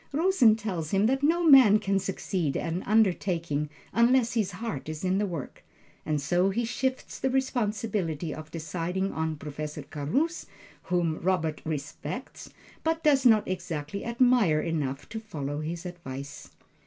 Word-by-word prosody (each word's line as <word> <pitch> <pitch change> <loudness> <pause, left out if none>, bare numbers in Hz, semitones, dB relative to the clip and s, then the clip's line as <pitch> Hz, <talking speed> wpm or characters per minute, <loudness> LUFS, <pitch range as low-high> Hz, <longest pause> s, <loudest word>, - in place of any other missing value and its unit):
Rosen 290 - +4
tells 190 -8 -4
him 195 +3 +2
that 265 +4 +2
no 330 +4 +3
man 265 -9 +8
can 195 -2 0
succeed 185 -5 -2
at 165 - -2
an 180 - -2
undertaking 175 -8 +1 0.2
unless 235 +1 +4
his 210 -5 0
heart 180 - -5
is 155 +1 -6
in 185 +1 +2
the 205 - 0
work, 165 -8 -6 0.4
and 155 -1 +1
so 175 +7 +2
he 230 +5 -1
shifts 260 +3 -3
the 265 - 0
responsibility 210 - -1
of 155 0 -9
deciding 175 +4 -3
on 160 0 -2
Professor 150 0 -6
Carus, 270 - -2 0.4
whom 175 -3 0
Robert 165 -4 0
"respects," 150 -3 -5 0.3
but 325 0 0
does 275 -4 +5
not 220 -3 +4
exactly 175 -1 -4
admire 235 -9 +3
enough 150 -5 -2
to 220 - -5
follow 150 -10 -5
his 165 +3 -5
advice. 140 -6 -8
185 Hz, 150 wpm, -28 LUFS, 155-230 Hz, 0.4 s, man